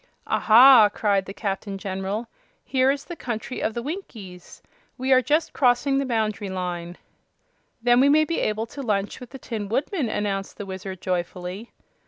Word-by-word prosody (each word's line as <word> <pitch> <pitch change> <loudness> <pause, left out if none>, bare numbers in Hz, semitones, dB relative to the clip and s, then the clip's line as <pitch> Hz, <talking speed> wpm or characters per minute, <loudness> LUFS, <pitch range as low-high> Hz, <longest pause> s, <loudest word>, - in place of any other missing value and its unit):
"Aha!" 230 -1 +7
cried 200 -3 0
the - - -6
Captain 200 -1 -4
General; 195 +4 -4 0.4
"here 260 0 +2
is 280 0 -1
the 345 - -7
Country 240 -2 -5
of 220 - -1
the 235 - -3
Winkies. 220 - -8 0.3
We 260 +1 +2
are 255 - +6
just 300 +6 0
crossing 270 +2 +2
the 275 - -2
boundary 215 -4 -1
line." 180 -2 -5 0.9
"Then 245 0 +5
we 275 +2 +5
may 310 +2 +4
be 335 +1 -2
able 215 +1 -1
to 275 +5 -9
lunch 205 -5 -2
with 250 -2 -10
the 270 - -9
Tin 215 -6 -5
Woodman," 275 - -1
announced 200 -2 -3
the 205 - -6
Wizard, 190 -1 -7
joyfully. 180 +4 -4
220 Hz, 170 wpm, -24 LUFS, 195-260 Hz, 0.9 s, Aha